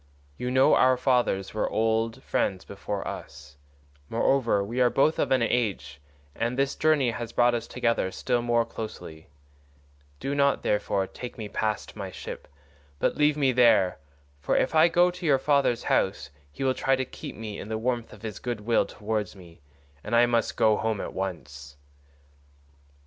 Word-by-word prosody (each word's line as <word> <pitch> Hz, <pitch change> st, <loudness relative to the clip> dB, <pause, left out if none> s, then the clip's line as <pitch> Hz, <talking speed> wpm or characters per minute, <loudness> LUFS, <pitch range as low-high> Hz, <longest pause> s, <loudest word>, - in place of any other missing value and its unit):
You 125 Hz, -, -4 dB
know 130 Hz, +1 st, +4 dB
our 130 Hz, 0 st, +4 dB
fathers 125 Hz, -7 st, +1 dB
were 110 Hz, -, -1 dB
old 110 Hz, +1 st, 0 dB
friends 95 Hz, -1 st, -1 dB
before 100 Hz, 0 st, -5 dB
us; 70 Hz, 0 st, -9 dB, 0.5 s
moreover, 115 Hz, -3 st, +2 dB
we 120 Hz, +5 st, -2 dB
are 125 Hz, -, +5 dB
both 150 Hz, +5 st, +2 dB
of -, -, +1 dB
an 130 Hz, -3 st, +3 dB
age, 105 Hz, -, -1 dB, 0.3 s
and 120 Hz, -, -2 dB
this 135 Hz, 0 st, +1 dB
journey 150 Hz, -6 st, +2 dB
has 115 Hz, 0 st, -6 dB
brought 120 Hz, 0 st, +3 dB
us 115 Hz, -1 st, -3 dB
together 115 Hz, -6 st, 0 dB
still 120 Hz, +5 st, -1 dB
more 120 Hz, -1 st, +1 dB
closely; 80 Hz, -9 st, -8 dB, 0.9 s
do 140 Hz, -, -3 dB
not, 140 Hz, 0 st, +2 dB
therefore, 100 Hz, -2 st, 0 dB
take 125 Hz, +5 st, -9 dB
me 110 Hz, -2 st, -5 dB
past 105 Hz, +1 st, -3 dB
my 100 Hz, -3 st, -5 dB
ship, -, -, -8 dB, 0.5 s
but -, -, 0 dB
leave 150 Hz, 0 st, +2 dB
me 135 Hz, -3 st, +3 dB
there, 115 Hz, -7 st, +4 dB, 0.4 s
for 70 Hz, -, 0 dB
if -, -, +1 dB
I 160 Hz, +1 st, +6 dB
go 175 Hz, +1 st, +3 dB
to 180 Hz, +1 st, -11 dB
your 140 Hz, -3 st, +5 dB
father's 140 Hz, -3 st, +1 dB
house 70 Hz, -7 st, 0 dB, 0.2 s
he 75 Hz, -, -6 dB
will 130 Hz, -1 st, +2 dB
try 135 Hz, +1 st, +1 dB
to 130 Hz, 0 st, -2 dB
keep -, -, -9 dB
me 110 Hz, -2 st, -7 dB
in 100 Hz, -, -8 dB
the 110 Hz, -, -2 dB
warmth 120 Hz, 0 st, -2 dB
of 105 Hz, 0 st, -14 dB
his 110 Hz, -3 st, -6 dB
good 120 Hz, -3 st, -4 dB
will 115 Hz, +2 st, +2 dB
towards 105 Hz, -1 st, -3 dB
me, 85 Hz, -4 st, -15 dB, 0.4 s
and -, -, -1 dB
I 120 Hz, +1 st, +6 dB
must 120 Hz, -2 st, 0 dB
go 110 Hz, -1 st, +4 dB
home 110 Hz, -2 st, -1 dB
at -, -, -5 dB
once." 75 Hz, -7 st, -6 dB
115 Hz, 175 wpm, -26 LUFS, 100-130 Hz, 0.9 s, I